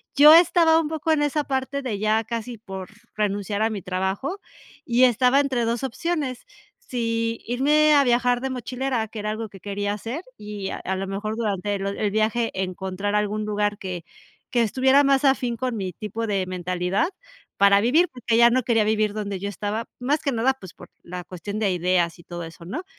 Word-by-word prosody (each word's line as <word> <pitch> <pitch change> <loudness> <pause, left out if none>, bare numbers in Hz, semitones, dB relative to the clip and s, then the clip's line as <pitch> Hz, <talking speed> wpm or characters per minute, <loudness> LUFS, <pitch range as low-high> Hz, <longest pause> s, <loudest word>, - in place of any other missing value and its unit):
yo 300 +2 +9
estaba 330 -1 +6
un 325 - -1
poco 320 +1 -1
en 310 -2 +3
esa 295 +1 +1
parte 270 0 -2
de 230 -7 -3
ya 215 +1 +2
casi 230 +1 -5
por 190 -4 -8 0.3
renunciar 205 0 -1
a 220 - +3
mi 210 -3 -4
trabajo, 190 - -2 0.5
y 240 +1 +3
estaba 250 +3 +4
entre 260 -4 0
2 235 +2 -1
opciones, 270 -1 -3 0.3
si 230 - -2
irme 300 +5 +4
a 285 - +6
viajar 245 0 +2
de 265 - -2
mochilera, 250 -1 -2
que 220 - -7
era 210 +1 -2
algo 220 0 -4
que 195 - -13
quería 205 +1 -3
hacer 230 - -5
y 210 -2 -6
a - - -4
a 190 - -1
lo 190 +1 -3
mejor 205 +3 -3
durante 205 -3 -1
lo 195 +1 -2
el 200 +1 -1
viaje 220 +2 +1
encontrar 190 +2 -3
algún 210 +1 0
lugar 210 0 0
que 180 -3 -6 0.5
que 240 - +2
estuviera 265 +5 +4
más 275 0 +3
afín 250 -3 +2
con 250 0 -2
mi 190 -4 -3
tipo 215 +5 -4
de 195 -3 0
mentalidad 185 - -1 0.5
para 200 0 +5
vivir. 300 - +4
Porque 240 -2 0
ya 235 0 +7
no 255 +2 +3
quería 225 -3 +2
vivir 215 -1 +1
donde 200 -2 -4
yo 200 +2 -3
estaba, 205 +3 -3
más 285 +5 0
que 280 - 0
nada, 245 +2 +2
pues 190 -10 -12
por - - -14
la 180 0 -7
cuestión 185 +4 -6
de 205 -3 +1
ideas 175 -1 +1
y - - -14
todo 175 0 -7
eso 165 +1 -10
¿no? 210 - -5
220 Hz, 200 wpm, -24 LUFS, 200-260 Hz, 0.5 s, yo